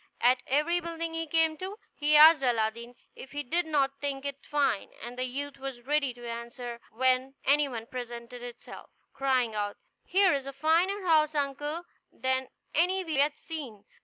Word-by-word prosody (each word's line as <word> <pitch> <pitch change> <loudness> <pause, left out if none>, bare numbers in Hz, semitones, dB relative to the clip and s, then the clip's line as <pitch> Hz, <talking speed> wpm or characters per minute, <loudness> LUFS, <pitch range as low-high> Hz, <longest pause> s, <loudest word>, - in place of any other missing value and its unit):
At 250 +1 +4
every 305 +6 +2
building 335 -1 -4
he 325 0 -3
came 320 0 +2
to, 380 +4 -6 0.2
he 300 0 +2
asked 310 0 +9
Aladdin 235 -1 0 0.2
if 270 - -11
he 290 0 -2
did 335 +6 0
not 275 -3 +1
think 280 -1 -3
it 280 -1 -5
fine; 285 -8 +1
and 240 +2 -7
the 255 0 -1
youth 280 +2 -5
was 265 -3 -6
ready 290 -1 +1
to 240 -1 -9
answer, 235 0 -6
when 260 +2 +1
any 290 +1 +4
one 230 -4 -6
presented 240 0 -7
itself, 245 -1 -10 0.2
crying 255 -4 +1
out, 205 -1 -2 0.3
"Here 380 -1 +4
is 275 -1 -2
a 275 - -5
finer 340 +7 +2
house, 310 -2 +4
uncle, 290 +4 -2 0.3
than 260 0 -1 0.3
any 370 +4 +2
we 325 - -6
have 285 - +1
yet - - -28
seen." 270 -11 -7
275 Hz, 180 wpm, -29 LUFS, 245-315 Hz, 0.3 s, asked